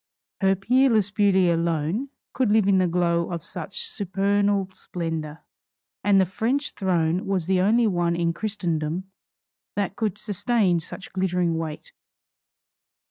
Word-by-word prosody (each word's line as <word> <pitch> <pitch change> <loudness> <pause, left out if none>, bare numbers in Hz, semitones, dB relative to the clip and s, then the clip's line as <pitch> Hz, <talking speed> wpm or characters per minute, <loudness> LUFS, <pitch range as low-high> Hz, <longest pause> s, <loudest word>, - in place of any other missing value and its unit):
Her 195 -1 +3
peerless 225 0 +3
beauty 190 -4 +3
alone 170 - -1 0.2
could 255 -4 +1
live 210 -1 +3
in 195 -1 +4
the 185 - +3
glow 170 0 +1
of 170 -3 -4
such 470 - -5
supernal 200 - 0
splendor, 165 -4 -5 0.6
and 200 -1 +4
the 190 - +4
French 240 - -1
throne 180 0 0
was 190 -4 0
the 185 0 +2
only 225 +5 +3
one 175 -4 +1
in 170 -1 0
Christendom 175 -3 -3 0.6
that 205 -1 -1
could 215 -5 -2
sustain 210 -3 +1
such 175 +4 -8
glittering 180 -3 0
weight. 160 -2 -5
190 Hz, 135 wpm, -24 LUFS, 170-205 Hz, 0.6 s, in